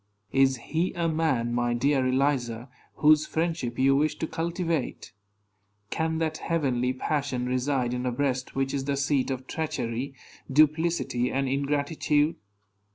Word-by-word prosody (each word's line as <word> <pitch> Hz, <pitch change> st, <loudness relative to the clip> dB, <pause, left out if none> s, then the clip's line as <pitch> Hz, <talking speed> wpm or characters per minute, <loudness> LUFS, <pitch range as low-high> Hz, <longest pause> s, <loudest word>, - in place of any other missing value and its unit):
Is 135 Hz, -1 st, +3 dB
he 160 Hz, +9 st, -2 dB
a 170 Hz, -2 st, 0 dB
man, 155 Hz, -8 st, 0 dB
my 120 Hz, 0 st, +1 dB
dear 135 Hz, +1 st, +2 dB
Eliza, 130 Hz, -3 st, 0 dB, 0.3 s
whose 150 Hz, 0 st, +4 dB
friendship 160 Hz, -7 st, -2 dB
you 135 Hz, +1 st, +4 dB
wish 150 Hz, +2 st, +2 dB
to -, -, -2 dB
cultivate? 165 Hz, -, -3 dB, 0.8 s
Can 160 Hz, 0 st, 0 dB
that 160 Hz, -1 st, -1 dB
heavenly 130 Hz, -7 st, 0 dB
passion 130 Hz, -1 st, -2 dB
reside 125 Hz, 0 st, 0 dB
in 125 Hz, 0 st, -2 dB
a -, -, +1 dB
breast 130 Hz, 0 st, -2 dB
which 135 Hz, 0 st, 0 dB
is 135 Hz, -1 st, -2 dB
the 140 Hz, 0 st, -1 dB
seat 140 Hz, -1 st, +1 dB
of 130 Hz, -1 st, -3 dB
treachery, 135 Hz, -4 st, -3 dB, 0.4 s
duplicity, 155 Hz, -4 st, +2 dB
and 135 Hz, 0 st, 0 dB
ingratitude? 145 Hz, +2 st, +1 dB
140 Hz, 140 wpm, -27 LUFS, 125-155 Hz, 0.8 s, whose